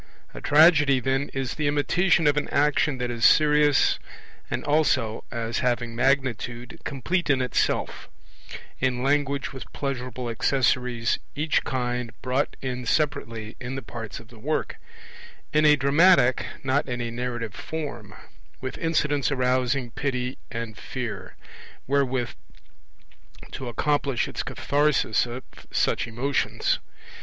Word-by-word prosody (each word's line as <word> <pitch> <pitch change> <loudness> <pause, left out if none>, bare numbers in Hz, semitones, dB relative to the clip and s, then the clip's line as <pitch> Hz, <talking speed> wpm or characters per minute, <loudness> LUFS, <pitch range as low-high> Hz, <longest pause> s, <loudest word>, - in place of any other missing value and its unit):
A - - -8
tragedy, 145 -3 +6
then, 135 +2 0
is 135 -1 -3
the 150 -1 -1
imitation 165 +4 +2
of 145 -1 +4
an 150 - 0
action 145 -1 +2
that 125 -1 -2
is 115 -1 -4
serious 150 -2 +5 0.5
and - - -3
also, 145 -7 +1
as 115 -1 -2
having 120 -2 -1
magnitude, 125 +1 -1
complete 160 +6 -1
in 135 -2 +4
itself; 125 -2 -1 0.7
in 125 -1 0
language 140 0 0
with 130 - -9
pleasurable 125 -3 -4
accessories, 120 -1 +1 0.2
each 150 +1 +1
kind 125 -2 -3
brought 130 +2 0
in 125 -1 -3
separately 115 -8 -1
in 125 +2 -5
the 135 - -5
parts 115 -2 -7
of - - -15
the - - -15
work; - - -2 0.8
in 155 0 +4
a 150 0 +7
dramatic, 140 -1 +4 0.2
not 135 +1 +1
in 120 -1 -2
a 120 -1 -3
narrative 120 -3 -4
form; 120 -9 -6 0.4
with 130 -1 -5
incidents 150 -4 +1
arousing 125 -1 +1
pity 125 0 -3
and 115 -2 -6
fear, 125 -3 -6 0.5
wherewith 130 -3 0 1.2
to 130 - -6
accomplish 140 +1 0
its - - -4
catharsis 145 -5 +1
of 120 +2 -6 0.3
such - - +1
emotions. 130 +5 0
130 Hz, 130 wpm, -25 LUFS, 120-145 Hz, 1.2 s, a